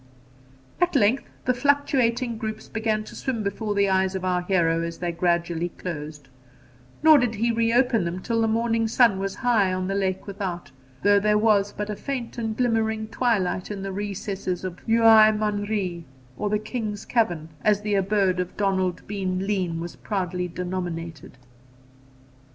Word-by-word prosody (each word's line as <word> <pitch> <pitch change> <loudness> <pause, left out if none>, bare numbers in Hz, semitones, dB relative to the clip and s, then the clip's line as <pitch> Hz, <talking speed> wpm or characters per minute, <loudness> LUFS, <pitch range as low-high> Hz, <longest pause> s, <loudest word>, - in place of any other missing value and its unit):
At 355 -2 +2
length 240 +1 +3 0.2
the 255 - +3
fluctuating 255 -4 +1
groups 220 0 -5
began 220 -1 -1
to - - -12
swim 235 -5 -3
before 205 +1 -2
the 200 0 +3
eyes 190 0 +1
of 185 -1 -3
our 180 -1 +1
hero 170 -3 +1
as 170 0 -4
they 175 -1 -2
gradually 170 0 0
closed; 150 -5 -7 0.8
nor 310 -2 +8
did 245 -3 0
he 230 +3 +1
re 230 0 +1
open 245 -3 +3
them 170 +2 -3
till 230 +3 -1
the 225 - +2
morning 225 0 +1
sun 225 -3 +4
was 195 0 -3
high 215 -6 +3
on 185 0 -2
the 195 - -1
lake 190 -1 -1
without, 185 -7 -5 0.3
though 205 0 +5
there 210 +1 +2
was 210 -2 +3
but 210 0 -4
a - - -3
faint 250 -1 -5
and 225 -1 -3
glimmering 220 -3 0
twilight 205 -7 0
in 200 -2 -5
the 195 - -4
recesses 195 -2 -4
of 180 -1 -6
Uaimh 220 -1 +6
an 205 -1 -2
Ri, 185 -5 -2 0.3
or 210 - -2
the 210 - +2
King's 215 -1 -5
Cavern, 175 -10 0
as 210 -1 +3
the 210 0 -2
abode 195 -1 +2
of 180 0 -4
Donald 190 -3 0
Bean 190 -2 -2
Lean 185 -5 -1
was 170 +1 -6
proudly 180 -3 -3
denominated. 170 -5 -5
205 Hz, 170 wpm, -24 LUFS, 185-225 Hz, 0.8 s, nor